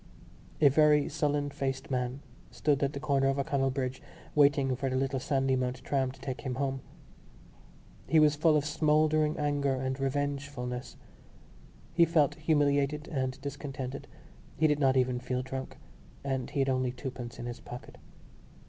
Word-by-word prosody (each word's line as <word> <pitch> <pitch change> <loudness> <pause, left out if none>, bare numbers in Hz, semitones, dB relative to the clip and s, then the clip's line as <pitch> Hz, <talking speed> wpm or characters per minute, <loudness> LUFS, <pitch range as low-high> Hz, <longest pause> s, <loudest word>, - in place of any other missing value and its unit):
A 150 - +8
very 150 0 +4
sullen 145 -1 0
faced 135 0 -3
man 125 +1 -2 0.3
stood 145 -2 0
at 140 0 +1
the 140 - -4
corner 140 -2 +2
of 135 0 +1
O'Connell 135 -1 +1
Bridge 130 -1 -3 0.3
waiting 140 -3 +4
for 135 +1 -2
the 130 - -2
little 135 0 0
Sandymount 130 -2 0
tram 135 -2 0
to 135 - -16
take 130 0 -5
him 130 -3 -3
home. 135 0 -2 1.3
He 160 - +5
was 150 -1 +5
full 155 +1 +4
of 145 - -1
smouldering 155 0 +2
anger 145 -2 +1
and 130 0 -2
revengefulness. 135 -2 -3 1.0
He 170 0 +6
felt 155 -4 +3
humiliated 150 -1 +1
and 130 -2 -2
discontented; 140 -1 -5 0.5
he 155 - +3
did 150 -1 +3
not 135 -2 +3
even 125 -1 +2
feel 125 0 -2
drunk; 130 0 -6 0.5
and 135 -2 -2
he - - -6
had 135 - +1
only 130 -1 +1
twopence 125 -2 -7
in 120 - -6
his 120 0 -5
pocket. 120 +1 -10
135 Hz, 155 wpm, -30 LUFS, 130-145 Hz, 1.3 s, A